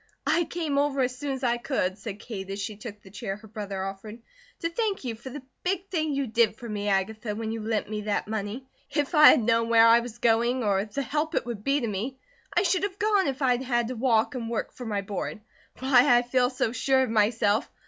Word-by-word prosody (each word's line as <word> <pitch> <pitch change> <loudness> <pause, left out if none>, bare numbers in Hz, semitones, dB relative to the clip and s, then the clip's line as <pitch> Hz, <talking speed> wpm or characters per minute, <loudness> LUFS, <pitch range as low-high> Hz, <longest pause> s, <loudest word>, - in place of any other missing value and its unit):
"I 320 +4 +2
came 310 -5 -1
over, 285 -1 +1
as 250 0 0
soon 285 +1 -3
as 265 0 -6
I 240 -1 +2
could," 235 -7 -1
said 200 0 -7
Kate 200 -3 -7
as 195 +1 -4
she 210 +1 -4
took 210 0 -9
the 190 - -14
chair 205 -2 -4
her 215 +2 -14
brother 200 -3 -5
offered, 205 +4 -7 0.4
"to 335 - 0
thank 420 -2 -1
you 245 -3 -3
for 230 +4 -9
the 270 +1 -8 0.2
big 375 +1 -2
thing 310 -5 -1
you 275 0 0
did 225 -2 +2
for 235 +2 -9
me, 210 -2 -3
Agatha, 210 +2 -1
when 220 0 -3
you 225 0 -4
lent 220 0 -1
me 210 0 -4
that 210 -1 -1
money. 220 +4 -4 0.2
If 295 +1 -1
I 300 -1 +9
had - - +5
known 230 0 +2
where 230 0 +7
I 230 +1 +7
was 235 -1 -7
going, 235 +2 +2
or 200 -2 +2
the 250 +6 -4
help 305 +3 -2
it - - 0
would 230 -4 -5
be 275 +3 +1
to 235 - -1
me, 220 +6 -3 0.3
I - - +2
should 370 -1 +2
have 395 -1 -3
gone 415 -4 +2
if 270 +1 -2
I'd 250 -1 +3
had 240 -3 0
to 255 - -4
walk 230 +1 +2
and 235 -3 -4
work 230 - -3
for 245 - -8
my 205 -2 -1
board. 205 +2 -4 0.4
Why, 255 -2 +5
I 240 - +2
feel 250 0 +2
so 250 -3 -1
sure 265 +2 +2
of 250 - -2
myself! 215 +1 +2
235 Hz, 245 wpm, -27 LUFS, 215-270 Hz, 0.4 s, I